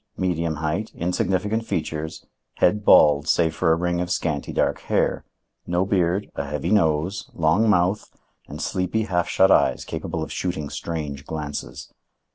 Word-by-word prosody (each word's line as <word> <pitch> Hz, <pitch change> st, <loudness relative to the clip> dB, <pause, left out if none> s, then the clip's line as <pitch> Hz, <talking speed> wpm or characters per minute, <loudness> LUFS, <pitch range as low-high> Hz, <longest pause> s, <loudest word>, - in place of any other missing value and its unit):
Medium 85 Hz, -3 st, -1 dB
height, 80 Hz, +8 st, -2 dB
insignificant 95 Hz, +5 st, -1 dB
features, 80 Hz, -6 st, -4 dB, 0.3 s
head 105 Hz, +4 st, +2 dB
bald 75 Hz, -5 st, +6 dB
save 80 Hz, -2 st, +2 dB
for 80 Hz, -, +1 dB
a -, -, +5 dB
ring 85 Hz, +1 st, -1 dB
of 90 Hz, -, -3 dB
scanty 80 Hz, -6 st, -2 dB
dark -, -, 0 dB
hair. -, -, 0 dB, 0.4 s
No 90 Hz, +2 st, +1 dB
beard, 95 Hz, 0 st, 0 dB
a 70 Hz, -, -4 dB
heavy 75 Hz, +3 st, -3 dB
nose, 85 Hz, -1 st, +1 dB
long 85 Hz, +8 st, +3 dB
mouth 95 Hz, +1 st, +1 dB, 0.4 s
and 75 Hz, -, -8 dB
sleepy 95 Hz, +6 st, -1 dB
half 90 Hz, -5 st, -1 dB
shut 95 Hz, 0 st, +4 dB
eyes -, -, +3 dB
capable 80 Hz, -2 st, -4 dB
of -, -, -7 dB
shooting 85 Hz, -5 st, -3 dB
strange 75 Hz, -4 st, -5 dB
glances. 75 Hz, -2 st, -6 dB
85 Hz, 150 wpm, -23 LUFS, 80-95 Hz, 0.4 s, bald